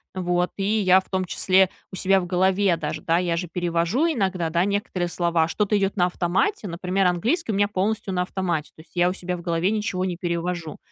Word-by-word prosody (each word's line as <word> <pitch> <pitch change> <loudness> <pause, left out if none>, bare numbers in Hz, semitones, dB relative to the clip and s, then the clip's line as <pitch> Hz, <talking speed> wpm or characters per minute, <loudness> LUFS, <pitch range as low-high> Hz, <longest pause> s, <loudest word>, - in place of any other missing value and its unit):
вот, 180 -1 0
и 195 - -2 0.2
я 185 0 +6
в - - -24
том 190 -1 0
числе 185 +1 +3 0.2
у - - -7
себя 195 +1 +3
в 180 - -4
голове 185 +1 +2
даже, 155 -1 -4
да, 165 +1 +2
я 170 -2 0
же 180 - -3
перевожу 175 - 0
иногда, 190 - 0
да, 170 +2 +1
некоторые 200 -3 -1
слова, 170 -2 +1
что-то 210 +4 +1
идет 195 +1 -1
на 180 -1 +4
автомате, 185 - 0
например, 185 +2 -1
английский 225 - +1
у 200 - -1
меня 205 0 +3
полностью 210 +1 -1
на 180 0 +1
автомате, 175 -4 -2
то 160 - -13
есть, 160 - -22
я 175 0 +3
у - - -2
себя 180 -1 -4
в - - -9
голове 170 +1 0
ничего 210 -4 -1
не 180 -2 -3
перевожу. 170 -2 -3
180 Hz, 220 wpm, -24 LUFS, 175-195 Hz, 0.2 s, я